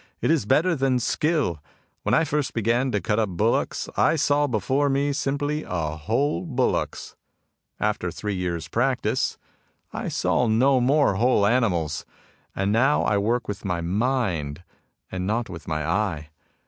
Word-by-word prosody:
It -, -, +1 dB
is 150 Hz, -11 st, +1 dB
better 160 Hz, +9 st, +3 dB
than 135 Hz, -2 st, +1 dB
skill. 140 Hz, -, 0 dB, 0.4 s
When -, -, +1 dB
I 165 Hz, -, +4 dB
first 150 Hz, -3 st, -2 dB
began 120 Hz, +4 st, +1 dB
to 105 Hz, -, +1 dB
cut 105 Hz, +2 st, 0 dB
up 110 Hz, -2 st, +1 dB
bullocks, 105 Hz, +6 st, 0 dB
I -, -, +3 dB
saw 145 Hz, -1 st, +2 dB
before 130 Hz, +5 st, +1 dB
me 140 Hz, +1 st, +1 dB
simply 145 Hz, +1 st, -1 dB
whole 90 Hz, -, -1 dB
bullocks. 130 Hz, -4 st, -1 dB, 0.6 s
After 105 Hz, -4 st, -1 dB
three 105 Hz, +4 st, -4 dB
years' 85 Hz, -4 st, -3 dB
practice, 125 Hz, +7 st, 0 dB, 0.6 s
I -, -, -4 dB
saw 125 Hz, -1 st, +1 dB
no 130 Hz, +5 st, +4 dB
more 135 Hz, -5 st, +3 dB
whole 115 Hz, -2 st, +3 dB
animals. 95 Hz, -, +1 dB, 0.5 s
And 95 Hz, +1 st, 0 dB
now 130 Hz, +7 st, +3 dB
I 105 Hz, -, +2 dB
work 115 Hz, +4 st, 0 dB
with 105 Hz, -1 st, -5 dB
my 90 Hz, -3 st, -2 dB
mind 90 Hz, -, -1 dB, 0.5 s
and 95 Hz, 0 st, -3 dB
not 110 Hz, 0 st, -1 dB
with 85 Hz, -2 st, -9 dB
my 75 Hz, -1 st, -2 dB
eye. 80 Hz, -4 st, -1 dB
115 Hz, 150 wpm, -24 LUFS, 90-135 Hz, 0.6 s, I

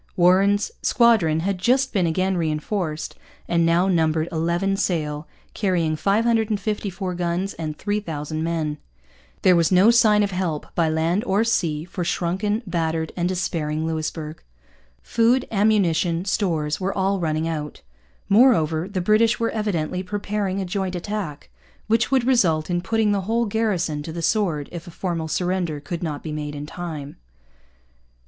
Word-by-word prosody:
Warren's 195 Hz, +3 st, +3 dB
squadron 205 Hz, -10 st, +3 dB
had 195 Hz, +1 st, -1 dB
just 260 Hz, +6 st, +2 dB
been 185 Hz, -5 st, +2 dB
again 185 Hz, +3 st, 0 dB
reinforced, 160 Hz, 0 st, -2 dB, 0.3 s
and 170 Hz, -1 st, +2 dB
now 170 Hz, +3 st, +3 dB
numbered 160 Hz, -3 st, +1 dB
eleven 170 Hz, +4 st, 0 dB
sail, 155 Hz, -6 st, -2 dB, 0.3 s
carrying 175 Hz, -6 st, 0 dB
554 205 Hz, -1 st, 0 dB
guns 175 Hz, +2 st, -2 dB
and 155 Hz, -2 st, -5 dB
3,000 160 Hz, -7 st, -3 dB
men. 160 Hz, -3 st, -2 dB, 0.6 s
There 185 Hz, -, +6 dB
was 170 Hz, 0 st, +2 dB
no 190 Hz, +5 st, +6 dB
sign 215 Hz, -3 st, +5 dB
of 200 Hz, -, -1 dB
help, 180 Hz, -5 st, -2 dB
by 165 Hz, -2 st, +1 dB
land 165 Hz, +6 st, 0 dB
or 205 Hz, 0 st, +2 dB
sea, 165 Hz, -9 st, 0 dB
for 180 Hz, 0 st, -4 dB
shrunken, 190 Hz, +6 st, -1 dB
battered, 165 Hz, -3 st, -2 dB
and 175 Hz, 0 st, 0 dB
despairing 160 Hz, -4 st, -2 dB
Louisbourg. 155 Hz, -1 st, -4 dB, 0.6 s
Food, 240 Hz, +3 st, +2 dB
ammunition, 185 Hz, -5 st, +2 dB
stores 160 Hz, -7 st, -1 dB
were 190 Hz, +2 st, -2 dB
all 195 Hz, +1 st, +1 dB
running 160 Hz, -1 st, -1 dB
out. 150 Hz, -2 st, -5 dB, 0.4 s
Moreover, 190 Hz, -, +4 dB
the 190 Hz, -2 st, -2 dB
British 215 Hz, +4 st, +3 dB
were 230 Hz, 0 st, 0 dB
evidently 185 Hz, -5 st, -2 dB
preparing 200 Hz, 0 st, -2 dB
a 190 Hz, -, -2 dB
joint 185 Hz, 0 st, -2 dB
attack, 180 Hz, -5 st, -5 dB, 0.3 s
which 225 Hz, +2 st, +2 dB
would 265 Hz, -2 st, +2 dB
result 180 Hz, -11 st, +2 dB
in 175 Hz, 0 st, 0 dB
putting 220 Hz, +2 st, +1 dB
the 200 Hz, -1 st, +1 dB
whole 230 Hz, +5 st, 0 dB
garrison 200 Hz, -8 st, -1 dB
to 160 Hz, -, -6 dB
the 170 Hz, +1 st, -5 dB
sword 170 Hz, -10 st, 0 dB
if 170 Hz, -1 st, -8 dB
a -, -, -7 dB
formal 170 Hz, -2 st, -3 dB
surrender 175 Hz, -2 st, -1 dB
should 175 Hz, -, -4 dB
not 155 Hz, -4 st, -4 dB
be 155 Hz, -, -5 dB
made 150 Hz, -1 st, -4 dB
in 145 Hz, 0 st, -5 dB
time. 155 Hz, -3 st, -7 dB
180 Hz, 150 wpm, -23 LUFS, 160-205 Hz, 0.6 s, There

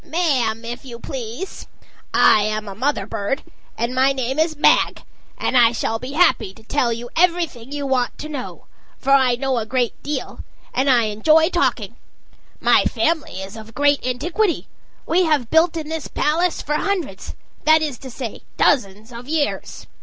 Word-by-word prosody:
"Ma'am, 255 Hz, -10 st, 0 dB
if 240 Hz, +3 st, -6 dB
you 245 Hz, -3 st, -8 dB
please. 245 Hz, -, -7 dB, 0.4 s
I -, -, +6 dB
am 215 Hz, 0 st, -2 dB
a 195 Hz, -, -6 dB
mother 265 Hz, +9 st, -1 dB
bird, 210 Hz, +9 st, -3 dB, 0.3 s
and 235 Hz, +2 st, -1 dB
my 265 Hz, +1 st, +3 dB
name 265 Hz, +2 st, -2 dB
is 315 Hz, 0 st, +1 dB
Mag, 295 Hz, -, +3 dB, 0.3 s
and -, -, -1 dB
I 235 Hz, -2 st, +6 dB
shall 225 Hz, 0 st, -2 dB
be 255 Hz, +4 st, -7 dB
happy 225 Hz, -, +2 dB
to 220 Hz, -, -17 dB
tell 245 Hz, 0 st, 0 dB
you 235 Hz, +1 st, -5 dB
everything 335 Hz, -8 st, +1 dB
you 290 Hz, -1 st, -3 dB
want 260 Hz, -2 st, 0 dB
to 305 Hz, -, -6 dB
know. 285 Hz, -5 st, -7 dB, 0.3 s
For 275 Hz, -, -2 dB
I 260 Hz, -3 st, +5 dB
know 260 Hz, 0 st, -1 dB
a 220 Hz, -, -3 dB
great 245 Hz, -1 st, -1 dB
deal; 290 Hz, -3 st, -4 dB, 0.3 s
and 270 Hz, +2 st, +1 dB
I 245 Hz, -3 st, +5 dB
enjoy 310 Hz, -, +3 dB
talking. 355 Hz, -, 0 dB, 0.6 s
My -, -, +4 dB
family 315 Hz, -, -1 dB
is 195 Hz, +2 st, -9 dB
of 220 Hz, 0 st, -11 dB
great 285 Hz, 0 st, +2 dB
antiquity; 335 Hz, -, -1 dB, 0.4 s
we 360 Hz, +2 st, +2 dB
have 290 Hz, -7 st, 0 dB
built 325 Hz, +1 st, +4 dB
in 310 Hz, -2 st, -5 dB
this 320 Hz, -2 st, -4 dB
palace 335 Hz, +4 st, 0 dB
for 300 Hz, -, -2 dB
hundreds 350 Hz, -, -3 dB, 0.3 s
that 315 Hz, 0 st, +5 dB
is 290 Hz, -5 st, -4 dB
to 265 Hz, -, -9 dB
say, 240 Hz, -2 st, -6 dB, 0.2 s
dozens 215 Hz, -3 st, +1 dB
of 240 Hz, +3 st, -9 dB
years. 305 Hz, -2 st, -2 dB
265 Hz, 175 wpm, -21 LUFS, 235-315 Hz, 0.6 s, I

